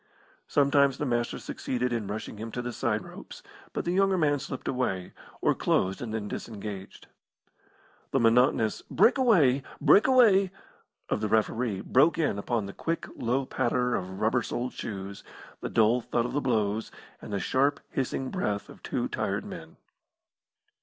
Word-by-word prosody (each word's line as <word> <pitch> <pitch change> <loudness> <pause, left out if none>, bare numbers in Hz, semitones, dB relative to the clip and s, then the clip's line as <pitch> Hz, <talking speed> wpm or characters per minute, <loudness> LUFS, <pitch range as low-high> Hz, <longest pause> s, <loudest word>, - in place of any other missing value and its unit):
Sometimes 140 -1 +3
the 150 - -2
Master 120 -2 -1
succeeded 125 -1 -3
in 110 -4 -2
rushing 105 +1 -5
him 110 +2 -6
to 125 - -3
the 120 0 -4
side - - -1
ropes, - - -11 0.3
but - - -3
the 175 - 0
younger 195 +1 +3
man 145 -4 +2
slipped 130 - -6
away, 95 -9 -2 0.3
or - - +3
closed 95 +1 0
and 120 -3 -4
then 110 -2 -3
disengaged. 100 -3 -7 1.0
The - - +1
monotonous 115 -1 +3
"Break 260 - +4
away! 160 - +4 0.2
Break 205 - +6
away!" 215 -7 +5 0.6
of - - 0
the 110 - 0
referee 110 -1 +1
broke 150 +5 +3
in 145 -11 0
upon 110 0 -1
the 100 - -7
quick, 165 0 -3
low 130 +3 0
patter 125 0 0
of 95 -1 -3
rubber 115 +3 +2
soled 125 +2 -3
shoes, 100 -2 -6 0.4
the - - -4
dull 115 +2 +3
thud 120 0 -1
of 125 - -4
the 145 - 0
blows, 110 -4 0 0.3
and - - -9
the 100 - -1
sharp, 140 +8 +1
hissing 130 0 -2
breath 105 - -2
of - - -13
two - - -2
tired - - -2
men. - - -9
120 Hz, 165 wpm, -28 LUFS, 110-140 Hz, 1.0 s, Break